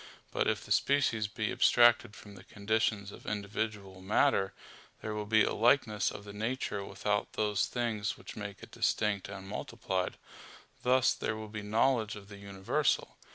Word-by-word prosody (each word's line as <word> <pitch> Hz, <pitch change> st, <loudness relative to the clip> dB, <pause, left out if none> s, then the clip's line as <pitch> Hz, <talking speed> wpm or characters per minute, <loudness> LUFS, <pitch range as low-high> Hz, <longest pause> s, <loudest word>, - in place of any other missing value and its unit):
But -, -, +1 dB
if -, -, 0 dB
the -, -, -11 dB
species 125 Hz, -7 st, +2 dB
be 110 Hz, 0 st, -2 dB
abstracted 120 Hz, -2 st, +5 dB
from 105 Hz, -, -12 dB
the 95 Hz, -, -13 dB
conditions 105 Hz, -1 st, -1 dB
of -, -, -13 dB
individual 100 Hz, -2 st, -3 dB
matter, 95 Hz, 0 st, +2 dB, 0.5 s
there 110 Hz, -, -4 dB
will 105 Hz, -1 st, -4 dB
be 110 Hz, 0 st, +5 dB
a -, -, 0 dB
likeness 115 Hz, -2 st, +3 dB
of 100 Hz, -, -8 dB
the 100 Hz, 0 st, -9 dB
nature 110 Hz, -1 st, -2 dB
without 105 Hz, +1 st, -2 dB
those 105 Hz, -2 st, +1 dB
things 115 Hz, -4 st, -2 dB
which -, -, -10 dB
make 100 Hz, -1 st, -7 dB
it -, -, -11 dB
distinct 105 Hz, -3 st, 0 dB
and 95 Hz, -1 st, -8 dB
multiplied; 100 Hz, -3 st, -3 dB, 0.6 s
thus 130 Hz, 0 st, +4 dB
there -, -, -2 dB
will 110 Hz, 0 st, -7 dB
be 105 Hz, 0 st, -5 dB
knowledge 110 Hz, +1 st, +1 dB
of 100 Hz, -1 st, -11 dB
the 100 Hz, -, -10 dB
universal. 100 Hz, -1 st, -1 dB
105 Hz, 165 wpm, -31 LUFS, 100-110 Hz, 0.6 s, abstracted